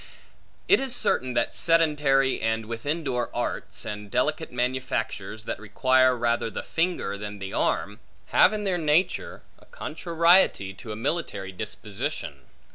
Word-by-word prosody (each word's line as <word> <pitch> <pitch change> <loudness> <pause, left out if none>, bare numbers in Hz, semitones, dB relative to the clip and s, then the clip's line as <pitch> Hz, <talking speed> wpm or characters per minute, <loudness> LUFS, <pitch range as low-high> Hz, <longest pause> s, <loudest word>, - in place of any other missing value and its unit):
It 405 - +6
is 265 -2 -1
certain 130 - 0
that 120 - +1
sedentary, 150 -5 +3
and 110 0 0
within 145 +9 -3
door 125 -4 -1
arts, - - -4
and 105 -1 -6
delicate - - 0
manufactures 120 -4 -2
(that 110 - -4
require 130 +4 +3
rather 120 -1 0
the 105 - -5
finger 165 - -1
than 105 0 -6
the 95 -1 -7
arm), 105 +3 0 0.3
have, 185 - +6
in 210 -1 -3
their 185 -3 0
nature, 160 +4 0 0.2
a - - -20
contrariety 165 - +2
to 110 +3 -9
a - - -4
military 110 - -2
disposition. 105 +7 -4
125 Hz, 140 wpm, -26 LUFS, 110-160 Hz, 0.3 s, It